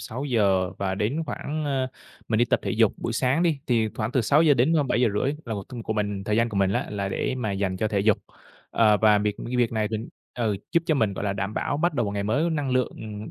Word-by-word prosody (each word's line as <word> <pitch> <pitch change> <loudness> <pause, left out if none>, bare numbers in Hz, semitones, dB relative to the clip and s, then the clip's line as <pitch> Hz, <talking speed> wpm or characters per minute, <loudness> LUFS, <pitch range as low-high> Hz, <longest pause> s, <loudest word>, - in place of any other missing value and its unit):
6:00 105 -8 0
và 95 -1 -1
đến 120 +11 -1
khoảng, 155 +1 -4
ơ, 135 -2 0 0.4
mình 110 -1 +1
đi 120 - +5
tập - - +1
thể - - -2
dục 110 -2 +3
buổi 115 - -3
sáng 130 +7 +1
đi 160 -5 +2
thì 115 -3 +2
khoảng 110 +4 -3
từ 130 - +3
6:00-7:30 135 -3 +3
là 115 -2 -4
một 100 - -4
t - - -17
của - - -1
mình, 100 -2 -2
thời 105 +1 0
gian 115 0 +3
của 105 - -5
mình 95 0 +2
á, - - -1
là 100 -1 -2
để 100 - -1
mà 115 -5 -2
dành 95 -1 -1
cho 110 - 0
thể 100 -2 0
dục. 105 0 +3 0.5
À, 105 -2 +4
và 105 -1 +4
việc 105 0 -1
cái 125 - -2
việc 120 -2 +2
này 110 -1 0
thì 110 - -1 0.4
ừ, 110 -4 0 0.2
giúp 170 - +3
cho 155 - +3
mình, 110 -7 +1
gọi - - -4
là, 100 - 0
đảm 100 +1 -3
bảo 145 - -1
bắt 170 0 +1
đầu 120 -4 +1
một 100 - -3
ngày 100 0 -2
mới 145 +12 +1
năng 145 -4 -1
lượng, 125 -1 +1
ừm, 105 -1 -7
110 Hz, 255 wpm, -25 LUFS, 105-130 Hz, 0.5 s, đi